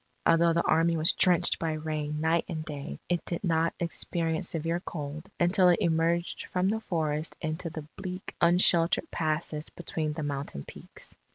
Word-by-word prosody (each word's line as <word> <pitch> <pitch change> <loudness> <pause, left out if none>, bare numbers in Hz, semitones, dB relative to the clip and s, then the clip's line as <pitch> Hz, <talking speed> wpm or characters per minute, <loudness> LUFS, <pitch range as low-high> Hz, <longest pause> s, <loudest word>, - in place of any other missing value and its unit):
Although 165 0 +5
the 170 - +1
Army 165 +1 +3
was 160 +1 +3
drenched 180 -3 +3
by 165 -1 -1
rain 155 -1 -3
night 160 +1 +2
and 155 -3 -4
day, 140 - -6
it 175 -1 0
did 170 - -4
not 165 -2 +1
experience 165 -1 0
severe 165 +1 -1
cold 155 -3 -6
until 180 +1 +5
it 175 - +5
emerged 170 +1 0
from 185 +1 +1
the 220 +2 0
forests 155 -6 -2
into 160 +1 -3
the 155 -1 -7
bleak 185 0 -6
unsheltered 170 - +4
passes 155 -1 -2
between 155 -3 -3
the 155 0 -4
mountain 140 - -4
peaks. - - -8
165 Hz, 165 wpm, -29 LUFS, 155-170 Hz, -, Although